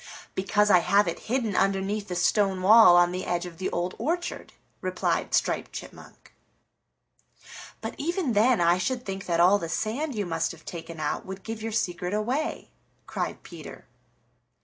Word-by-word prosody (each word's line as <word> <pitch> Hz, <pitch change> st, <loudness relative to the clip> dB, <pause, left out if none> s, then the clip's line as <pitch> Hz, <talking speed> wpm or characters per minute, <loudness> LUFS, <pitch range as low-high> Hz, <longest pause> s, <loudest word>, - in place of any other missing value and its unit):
"Because 205 Hz, +2 st, +2 dB
I 180 Hz, -, +7 dB
have 200 Hz, +3 st, +3 dB
it 170 Hz, -, -3 dB
hidden 230 Hz, -5 st, 0 dB
underneath 195 Hz, +2 st, 0 dB
the 180 Hz, -, -4 dB
stone 190 Hz, 0 st, +1 dB
wall 210 Hz, -3 st, +8 dB
on 175 Hz, 0 st, +4 dB
the 185 Hz, +1 st, -4 dB
edge 175 Hz, 0 st, -2 dB
of 170 Hz, -1 st, -10 dB
the 190 Hz, -, -1 dB
Old 175 Hz, +1 st, -2 dB
Orchard," 345 Hz, +3 st, -3 dB, 0.3 s
replied -, -, -1 dB
Striped -, -, -1 dB
Chipmunk. -, -, -11 dB, 1.5 s
"But -, -, -5 dB
even 335 Hz, -3 st, -1 dB
then, 225 Hz, +2 st, +4 dB
I 170 Hz, +1 st, +3 dB
should 250 Hz, +5 st, -2 dB
think 195 Hz, 0 st, -5 dB
that 170 Hz, -1 st, 0 dB
all 185 Hz, +4 st, +5 dB
the 165 Hz, -, -5 dB
sand 245 Hz, -, -2 dB
you 205 Hz, -2 st, -2 dB
must 165 Hz, -1 st, -1 dB
have 160 Hz, -, -16 dB
taken 165 Hz, -1 st, -8 dB
out 150 Hz, -1 st, -2 dB
would 190 Hz, 0 st, -7 dB
give 225 Hz, -1 st, -6 dB
your 225 Hz, +1 st, -4 dB
secret 180 Hz, -3 st, -2 dB
away," 250 Hz, +9 st, -2 dB, 0.3 s
cried -, -, -4 dB
Peter. -, -, -11 dB
195 Hz, 170 wpm, -26 LUFS, 175-225 Hz, 1.5 s, wall